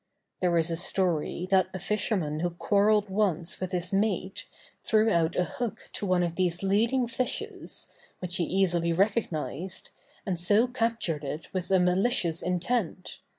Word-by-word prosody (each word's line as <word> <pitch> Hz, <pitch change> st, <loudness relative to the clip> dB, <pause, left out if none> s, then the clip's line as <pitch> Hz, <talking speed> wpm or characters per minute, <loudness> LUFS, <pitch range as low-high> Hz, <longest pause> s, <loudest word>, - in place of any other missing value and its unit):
There 175 Hz, -2 st, +2 dB
is 165 Hz, 0 st, +1 dB
a 165 Hz, -, -1 dB
story 175 Hz, -1 st, 0 dB
that 190 Hz, -1 st, +4 dB
a -, -, -3 dB
fisherman 190 Hz, -6 st, -1 dB
who 175 Hz, +2 st, 0 dB
quarrelled 205 Hz, +4 st, +2 dB
once 185 Hz, -4 st, 0 dB
with 185 Hz, 0 st, -4 dB
his 180 Hz, 0 st, -1 dB
mate, 195 Hz, -1 st, -1 dB, 0.4 s
threw 220 Hz, 0 st, +3 dB
out 165 Hz, -3 st, +2 dB
a 180 Hz, -, +2 dB
hook 240 Hz, +4 st, -5 dB
to 205 Hz, -, -3 dB
one 180 Hz, -1 st, +3 dB
of 170 Hz, -1 st, -1 dB
these 180 Hz, 0 st, 0 dB
leading 230 Hz, +6 st, +2 dB
fishes, 240 Hz, +2 st, -2 dB, 0.3 s
which 180 Hz, 0 st, -2 dB
he 175 Hz, -, +1 dB
easily 175 Hz, -2 st, +1 dB
recognized, 185 Hz, -3 st, -1 dB, 0.3 s
and 180 Hz, -4 st, -2 dB
so 205 Hz, +7 st, +4 dB
captured 230 Hz, -, -1 dB
it 150 Hz, +3 st, -6 dB
with 185 Hz, -2 st, -3 dB
a 190 Hz, -1 st, +4 dB
malicious 180 Hz, -1 st, +2 dB
intent. 180 Hz, +1 st, -2 dB
185 Hz, 155 wpm, -28 LUFS, 170-210 Hz, 0.4 s, that